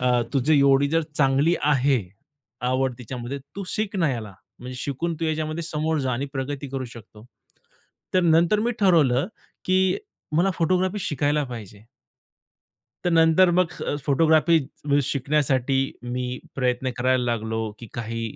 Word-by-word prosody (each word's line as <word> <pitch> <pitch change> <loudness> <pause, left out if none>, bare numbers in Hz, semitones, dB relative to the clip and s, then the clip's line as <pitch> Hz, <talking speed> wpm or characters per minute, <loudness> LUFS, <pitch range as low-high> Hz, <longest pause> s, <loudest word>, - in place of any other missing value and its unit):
अ, 125 -1 +3
तुझी 140 +3 +3
एवढी 140 0 +4
जर 165 +1 +2 0.2
चांगली 140 +4 +3
आहे 140 -2 +3 0.7
आवड 130 0 0
तिच्यामध्ये, 125 +2 -6 0.2
तू 200 - -4
शिक 210 0 -2
ना 165 -6 +2
याला. 110 -5 -5 0.3
म्हणजे 125 +1 -8
शिकून 155 +6 -2
तू - - 0
याच्यामध्ये 155 +1 -2
समोर 160 0 -1
जा 130 -2 -1
आणि 130 +4 -2
प्रगती 140 +1 -4
करू 135 0 -4
शकतो. 110 -2 -13 0.9
तर 185 - +5
नंतर 170 +5 +4
मी 235 +2 +1
ठरवलं 155 -8 +4 0.4
की 185 0 +3 0.4
मला 180 +4 +3
फोटोग्राफी 185 +4 +1
शिकायला 150 -2 0
पाहिजे. 110 -5 -9 1.2
तर 175 - +2
नंतर 165 +2 +5
मग 175 -1 +2
अ, - - -1
फोटोग्राफी 160 +3 +4 0.3
म्हणजे 145 0 +3
शिकण्यासाठी 140 -2 +1 0.4
मी 125 0 -3 0.2
प्रयत्न 130 0 0
करायला 130 0 +2
लागलो 110 -2 -2
की 120 - -9
काही 115 0 -4
140 Hz, 145 wpm, -24 LUFS, 125-165 Hz, 1.2 s, तर